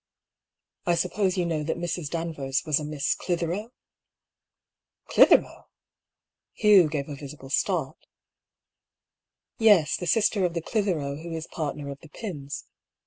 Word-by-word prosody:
I 175 Hz, -, +4 dB
suppose 185 Hz, +2 st, 0 dB
you 180 Hz, -, +1 dB
know 160 Hz, -3 st, -1 dB
that 155 Hz, +2 st, -2 dB
Mrs. 170 Hz, -3 st, -3 dB
Danvers 155 Hz, -5 st, -2 dB
was 155 Hz, -2 st, +2 dB
a -, -, -5 dB
Miss 150 Hz, -1 st, -1 dB
Clithero? 175 Hz, +5 st, -2 dB, 0.7 s
" -, -, -56 dB
"Clithero?*' -, -, +5 dB, 0.9 s
Hugh 200 Hz, -7 st, +6 dB
gave 145 Hz, -2 st, -3 dB
a 145 Hz, -, -6 dB
visible 140 Hz, -1 st, -10 dB
start. -, -, 0 dB, 0.9 s
" -, -, -64 dB
Yes; 205 Hz, -9 st, +5 dB
the 175 Hz, -, -5 dB
sister 205 Hz, +1 st, +2 dB
of 175 Hz, -1 st, 0 dB
the 170 Hz, -, -1 dB
Clithero 160 Hz, -10 st, -1 dB
who 170 Hz, 0 st, -7 dB
is 160 Hz, 0 st, -4 dB
partner 150 Hz, -4 st, -4 dB
of 140 Hz, -, -9 dB
the 160 Hz, -, -15 dB
Pyms. 150 Hz, -9 st, -6 dB
165 Hz, 140 wpm, -26 LUFS, 150-180 Hz, 0.9 s, Hugh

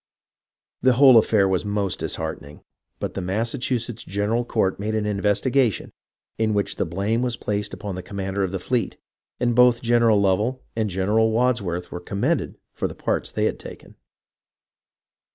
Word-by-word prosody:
The 130 Hz, 0 st, +4 dB
whole 130 Hz, -2 st, +8 dB
affair 105 Hz, -3 st, +3 dB
was 95 Hz, -2 st, 0 dB
most 100 Hz, -2 st, -1 dB
dis -, -, -2 dB
heartening, 70 Hz, +1 st, -6 dB, 0.4 s
but -, -, -4 dB
the 95 Hz, -, -4 dB
Massachusetts 115 Hz, +4 st, -2 dB
General 105 Hz, +5 st, -1 dB
Court 100 Hz, -6 st, 0 dB
made 110 Hz, +2 st, -2 dB
an 110 Hz, -1 st, 0 dB
investigation, 105 Hz, +4 st, +1 dB, 0.5 s
in 110 Hz, -1 st, +1 dB
which 100 Hz, -, -1 dB
the -, -, -1 dB
blame 100 Hz, +7 st, -1 dB
was 125 Hz, -3 st, -1 dB
placed 105 Hz, 0 st, -2 dB
upon 105 Hz, -2 st, -6 dB
the 90 Hz, -, -5 dB
commander 95 Hz, +1 st, -3 dB
of 95 Hz, -, -2 dB
the 95 Hz, -, -2 dB
fleet, 120 Hz, +6 st, -2 dB, 0.4 s
and 120 Hz, -1 st, +1 dB
both 125 Hz, -1 st, +5 dB
General 115 Hz, -2 st, +4 dB
Lovell 105 Hz, +7 st, +1 dB
and 110 Hz, -2 st, 0 dB
Gen 95 Hz, +1 st, -2 dB
eral 110 Hz, +1 st, +4 dB
Wadsworth 110 Hz, -7 st, 0 dB
were 90 Hz, -, -5 dB
commended 120 Hz, -, -1 dB, 0.2 s
for -, -, -2 dB
the -, -, -9 dB
parts -, -, -2 dB
they -, -, 0 dB
had -, -, -1 dB
taken. -, -, -11 dB
105 Hz, 170 wpm, -23 LUFS, 95-120 Hz, 0.5 s, whole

